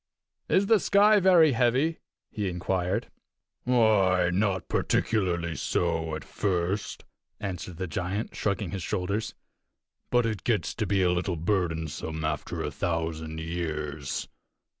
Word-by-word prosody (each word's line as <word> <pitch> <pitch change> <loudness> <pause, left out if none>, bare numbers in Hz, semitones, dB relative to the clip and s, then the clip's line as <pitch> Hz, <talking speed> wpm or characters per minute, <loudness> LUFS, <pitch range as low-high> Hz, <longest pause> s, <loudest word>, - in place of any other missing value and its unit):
"Is 195 - +4
the 220 +1 +5
sky 205 +2 +5
very 175 -5 +6
heavy?" 130 +7 +2 0.3
he 105 -3 -2
inquired. 90 +4 -1 0.5
"Why, 100 -7 +4
not 95 -1 0
particularly 85 -6 0
so 80 +1 -1
at 80 - -6
first," 95 0 -2 0.3
answered 90 -4 -5
the 95 - -2
giant, 95 +5 -3
shrugging 100 -3 -1
his 95 -1 -4
shoulders, 105 +5 -2 0.7
"but 120 -1 +3
it 110 -3 -2
gets 105 -9 0
to 110 - -2
be 95 -1 +2
a 90 - +3
little 90 0 -1
burdensome 80 -3 -2
after 75 -1 -3
a - - -3
thousand 80 -2 -3
years." 75 -4 -3
95 Hz, 125 wpm, -27 LUFS, 85-110 Hz, 0.7 s, very